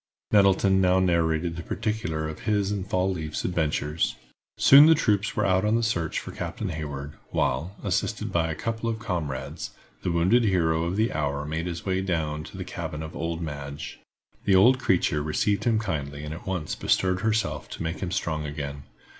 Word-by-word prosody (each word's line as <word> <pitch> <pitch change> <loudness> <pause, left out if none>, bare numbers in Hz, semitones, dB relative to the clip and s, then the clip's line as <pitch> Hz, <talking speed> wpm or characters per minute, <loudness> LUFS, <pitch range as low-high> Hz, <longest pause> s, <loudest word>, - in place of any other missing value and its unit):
Nettleton 95 -1 +4
now 90 0 +4
narrated 85 -2 +1
the - - -4
particulars 85 -6 -2
of 75 - -10
his 105 -2 0
and 100 -2 -3
Fall 95 0 +1
leaf's 80 -3 -4
adventures. 80 -3 0 0.4
Soon 140 +3 +9
the 160 - +7
troops 105 -7 +1
were - - +1
out 95 0 +3
on 105 +1 +2
the 115 - +1
search 85 -8 -1
for - - -4
Captain - - -4
Hayward, 75 -2 -5 0.2
while, 80 +10 -1
assisted - - -1
by 80 -1 +1
a 80 - -2
couple 115 +7 -2
of 115 - -2
comrades, 75 -7 -4 0.3
the 90 - -1
wounded 95 +9 +3
hero 85 -5 +2
of 85 +2 -2
the 110 +3 +1
hour 70 -1 -1
made 80 +3 -3
his 85 -1 -5
way 95 -1 0
down 80 -5 -1
to - - -10
the - - -5
cabin 75 +1 -5
of 80 - -8
old 85 +1 -3
Madge. 70 -2 -6 0.5
The 95 - +4
old 125 +8 +6
creature 90 - +2
received 100 +9 0
him 115 -2 +3
kindly 75 -9 -3
and 75 +1 -5
at 80 - -10
once 90 -5 -2
bestirred 90 0 +1
herself 110 0 -1
to - - -6
make 80 +2 -3
him 95 - -3
strong 80 -3 -2
again. 70 -1 -5
85 Hz, 190 wpm, -26 LUFS, 75-100 Hz, 0.5 s, Soon